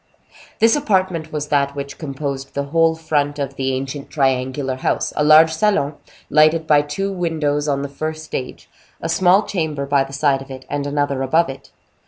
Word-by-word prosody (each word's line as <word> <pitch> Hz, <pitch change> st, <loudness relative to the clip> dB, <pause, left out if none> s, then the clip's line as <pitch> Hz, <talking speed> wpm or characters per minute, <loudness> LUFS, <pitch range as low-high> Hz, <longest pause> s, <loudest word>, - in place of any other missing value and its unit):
This 225 Hz, +3 st, +4 dB
apartment 185 Hz, -, 0 dB
was 150 Hz, -1 st, -4 dB
that 140 Hz, -1 st, +1 dB
which 140 Hz, 0 st, -6 dB
composed 140 Hz, -2 st, -5 dB
the 140 Hz, -, -1 dB
whole 165 Hz, +3 st, +2 dB
front 150 Hz, -3 st, -1 dB
of 140 Hz, -2 st, -3 dB
the 135 Hz, 0 st, -1 dB
ancient 135 Hz, +2 st, -5 dB
triangular 130 Hz, -1 st, 0 dB
house; -, -, -1 dB
a 150 Hz, -, +1 dB
large 155 Hz, +2 st, +7 dB
salon, 175 Hz, -5 st, +1 dB, 0.3 s
lighted 155 Hz, +2 st, +4 dB
by 150 Hz, -2 st, +5 dB
two 170 Hz, +7 st, -3 dB
windows 155 Hz, -5 st, -1 dB
on 140 Hz, -1 st, 0 dB
the -, -, -3 dB
first 155 Hz, +3 st, -5 dB
stage, 130 Hz, -4 st, -6 dB, 0.3 s
a -, -, -4 dB
small 180 Hz, +4 st, +4 dB
chamber 155 Hz, -8 st, -2 dB
by 140 Hz, -1 st, +2 dB
the 135 Hz, -, -10 dB
side 140 Hz, -1 st, +1 dB
of 135 Hz, -, -11 dB
it, 130 Hz, -1 st, -9 dB
and 145 Hz, 0 st, -2 dB
another 145 Hz, -2 st, -1 dB
above 160 Hz, +4 st, +2 dB
it. 135 Hz, -, -9 dB
145 Hz, 185 wpm, -20 LUFS, 140-160 Hz, 0.3 s, large